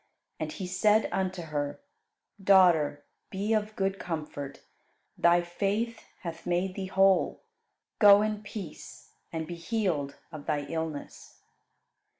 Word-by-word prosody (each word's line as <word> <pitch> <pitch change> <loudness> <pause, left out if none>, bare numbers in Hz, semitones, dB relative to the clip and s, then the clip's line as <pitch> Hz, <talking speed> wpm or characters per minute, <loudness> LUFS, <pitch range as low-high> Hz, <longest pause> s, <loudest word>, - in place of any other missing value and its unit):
And 155 -1 -3
He 190 - -5
said 210 +4 +3
unto 185 -2 -1
her, 145 -2 -3 0.6
"Daughter, 175 -7 +5 0.2
be 205 +3 -1
of 215 0 0
good 195 0 -1
comfort; 150 -4 -5 0.5
thy 175 0 +4
faith 205 +6 -2 0.2
hath 165 -2 -7
made 180 +2 0
thee 190 -1 -4
whole. 190 -1 +3 0.6
Go 205 -1 +8
in 215 -1 -2
peace, 200 -6 -9 0.2
and 160 -1 -3
be 175 - -6
healed 170 -6 -1 0.2
of 155 -3 -9
thy 150 -2 +1
illness." 160 0 -6
180 Hz, 125 wpm, -29 LUFS, 160-200 Hz, 0.6 s, Go